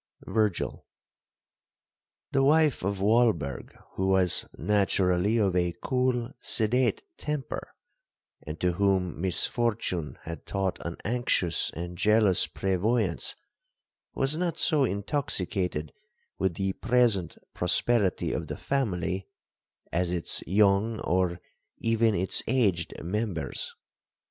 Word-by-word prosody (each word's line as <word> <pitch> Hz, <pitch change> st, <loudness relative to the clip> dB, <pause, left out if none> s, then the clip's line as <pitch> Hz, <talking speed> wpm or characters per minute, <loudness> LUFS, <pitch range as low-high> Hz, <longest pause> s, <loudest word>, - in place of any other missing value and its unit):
VIRGIL. 110 Hz, -4 st, -1 dB, 1.5 s
'The 135 Hz, -, +2 dB
wife 150 Hz, 0 st, +4 dB
of 100 Hz, 0 st, -2 dB
Walberg, 105 Hz, -, +1 dB
who 95 Hz, -, -2 dB
was 95 Hz, -2 st, +3 dB
naturally 100 Hz, 0 st, +2 dB
of 100 Hz, -5 st, +1 dB
a 90 Hz, -1 st, +1 dB
cool 125 Hz, -1 st, 0 dB
sedate 120 Hz, +3 st, +2 dB, 0.2 s
temper, 150 Hz, -3 st, -4 dB, 0.7 s
and 75 Hz, +2 st, -7 dB
to 90 Hz, -, +2 dB
whom 95 Hz, -3 st, 0 dB
misfortune 95 Hz, -2 st, 0 dB
had 80 Hz, -2 st, -8 dB
taught 95 Hz, -2 st, -2 dB
an 85 Hz, 0 st, -5 dB
anxious 100 Hz, -, 0 dB
and 85 Hz, +1 st, -6 dB
jealous 105 Hz, -2 st, +3 dB
prevoyance, 95 Hz, +1 st, 0 dB, 0.8 s
was 135 Hz, +3 st, +2 dB
not 170 Hz, 0 st, -1 dB
so 145 Hz, -4 st, +3 dB
intoxicated 100 Hz, -, -2 dB, 0.5 s
with 95 Hz, -3 st, 0 dB
the 95 Hz, +1 st, -1 dB
present 115 Hz, -9 st, +1 dB, 0.2 s
prosperity 100 Hz, +3 st, +1 dB
of -, -, -3 dB
the -, -, -5 dB
family, 95 Hz, -8 st, -2 dB, 0.6 s
as 90 Hz, +1 st, 0 dB
its 85 Hz, -1 st, 0 dB
young, 105 Hz, +3 st, +3 dB
or 90 Hz, 0 st, 0 dB, 0.4 s
even 115 Hz, -1 st, +2 dB
its 95 Hz, +2 st, +1 dB
aged 100 Hz, -9 st, +1 dB
members. 100 Hz, -1 st, -3 dB
100 Hz, 105 wpm, -27 LUFS, 90-115 Hz, 1.5 s, wife